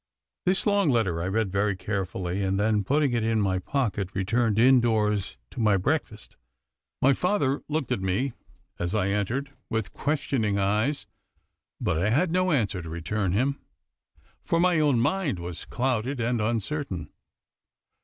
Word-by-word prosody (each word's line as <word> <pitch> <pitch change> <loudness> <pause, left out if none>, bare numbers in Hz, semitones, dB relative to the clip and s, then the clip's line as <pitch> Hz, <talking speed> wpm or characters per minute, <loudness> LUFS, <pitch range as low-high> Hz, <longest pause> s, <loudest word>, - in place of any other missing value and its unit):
This 185 +1 +2
long 200 -5 +3
letter 100 -10 +1
I 90 - -2
read 105 0 0
very 100 +1 +1
carefully, 95 -1 -3
and 95 0 0
then 105 0 +2
putting 140 +4 +2
it 115 -2 +1
in 110 0 +1
my 95 -3 +1
pocket 100 -3 -1
returned 110 +3 +1
indoors 110 -5 +3
to - - -8
my 105 -3 +4
breakfast. 110 - -2 0.7
My 135 +1 +6
father 145 -4 0
looked 150 -4 -2
at 125 - 0
me, 95 +8 0 0.5
as 90 +3 -1
I 100 -2 +1
entered, 115 +8 -1 0.2
with 110 -4 -2
questioning 135 -8 0
eyes, 105 +9 0 0.7
but 80 - 0
I 100 +5 +1
had 160 +9 +2
no 185 +1 +2
answer 105 - 0
to 80 - -8
return 90 +4 -2
him, 135 +7 +1 0.8
for 165 - +1
my 175 -2 +3
own 145 -6 +3
mind 150 - 0
was 85 0 -6
clouded 125 +1 -1
and 120 0 0
uncertain. 110 - -2
110 Hz, 155 wpm, -26 LUFS, 100-135 Hz, 0.8 s, My